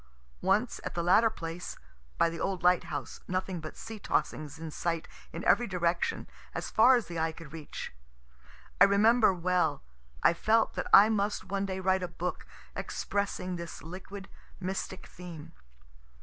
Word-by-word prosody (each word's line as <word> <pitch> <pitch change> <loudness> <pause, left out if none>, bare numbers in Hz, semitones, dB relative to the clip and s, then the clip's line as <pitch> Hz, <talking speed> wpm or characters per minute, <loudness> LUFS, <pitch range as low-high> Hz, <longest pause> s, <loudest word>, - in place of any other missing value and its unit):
Once, - - +1
at - - -5
the 170 - 0
latter 210 +6 +5
place, 170 -4 -6 0.4
(by - - +4
the 165 0 -5
old 190 -3 -2
lighthouse, 180 0 +1
nothing 185 -1 -2
but 155 -1 -8
sea 220 -1 -7
tossings 155 -6 -1
in 160 -1 -6
sight 165 +1 -2 0.2
in - - -6
every 240 - +4
direction 175 -2 0 0.3
as - - -4
far 250 +4 +7
as 240 - 0
the 170 -1 -5
eye 160 0 +1
could 160 -2 -12
reach,) 155 - -7 0.9
I - - +12
remember 215 +3 +5
well, 175 -4 0 0.4
I - - +6
felt 220 +6 +2
that - - -3
I 210 +2 +9
must 205 -1 0
one 200 0 -2
day 190 -1 -3
write 190 0 +2
a 180 - -2
book 180 +1 -4 0.3
expressing 185 -3 -2
this 170 -4 -7
liquid, 190 +4 -8 0.3
mystic 190 0 -4
theme. 170 -4 -10
180 Hz, 160 wpm, -30 LUFS, 170-200 Hz, 0.9 s, I